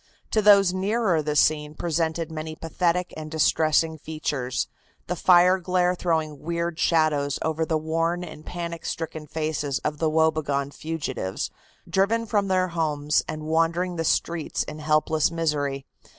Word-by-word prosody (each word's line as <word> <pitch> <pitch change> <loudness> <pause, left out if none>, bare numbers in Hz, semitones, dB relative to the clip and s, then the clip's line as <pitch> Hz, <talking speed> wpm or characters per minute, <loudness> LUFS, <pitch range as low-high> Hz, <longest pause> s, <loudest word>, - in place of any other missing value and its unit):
To 215 - +3
those 200 -3 +6
nearer 190 -2 +1
the 150 0 -2
scene 150 0 +2
presented 165 0 -1
many 155 0 -5
pathetic 175 +2 -1
and 155 -1 -7
distressing 160 +1 +2
features, 145 -5 -3 0.4
the 180 - -2
fire 180 +1 +5
glare 180 0 +1
throwing 160 -5 -1
weird 170 +1 -3
shadows 150 -4 +2
over 160 0 -1
the 160 - +1
worn 165 +3 -1
and 155 -3 -9
panic 170 -1 -5
stricken 160 -2 -5
faces 155 -2 -2
of 150 - -2
the 160 - +2
woe 160 +1 +4
begone 140 -3 -2
fugitives, 140 -12 -4 0.4
driven 200 +6 +1
from 205 -2 0
their 185 -1 +1
homes 150 -3 +1
and 155 0 -5
wandering 165 +3 +1
the 165 - -1
streets 165 0 0
in 155 - -8
helpless 155 0 +2
misery. 145 -5 -1
160 Hz, 150 wpm, -25 LUFS, 155-175 Hz, 0.4 s, those